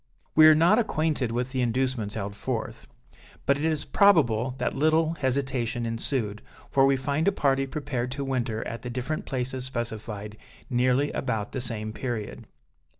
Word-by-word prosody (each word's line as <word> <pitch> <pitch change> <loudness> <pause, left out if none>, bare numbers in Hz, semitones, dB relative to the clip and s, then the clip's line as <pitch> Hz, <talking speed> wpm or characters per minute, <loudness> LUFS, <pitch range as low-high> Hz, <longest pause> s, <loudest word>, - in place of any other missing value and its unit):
We 155 0 +8
are 155 - +8
not 170 +8 +5
acquainted 155 - 0
with 125 +2 -2
the 130 -1 -1
inducements 120 -3 -1
held 100 -2 -4
forth; - - -4 0.6
but 140 - +4
it 145 - -4
is 155 -2 0
probable 130 - +3
that - - -1
little 155 +3 +3
hesitation 130 -5 -1
ensued, 115 -2 -2 0.3
for 135 0 +5
we 135 - +4
find 140 +5 -1
a - - +6
party 135 -6 +1
prepared 135 -4 -3
to 140 0 -3
winter 120 -4 -2
at 115 - -6
the 125 - -6
different 125 +6 -3
places 130 -1 -2
specified, 110 -4 -5 0.3
nearly 125 +3 +2
about 110 -6 -2
the 130 - -3
same 110 -3 -3
period. 115 -4 -5
130 Hz, 160 wpm, -26 LUFS, 115-145 Hz, 0.6 s, We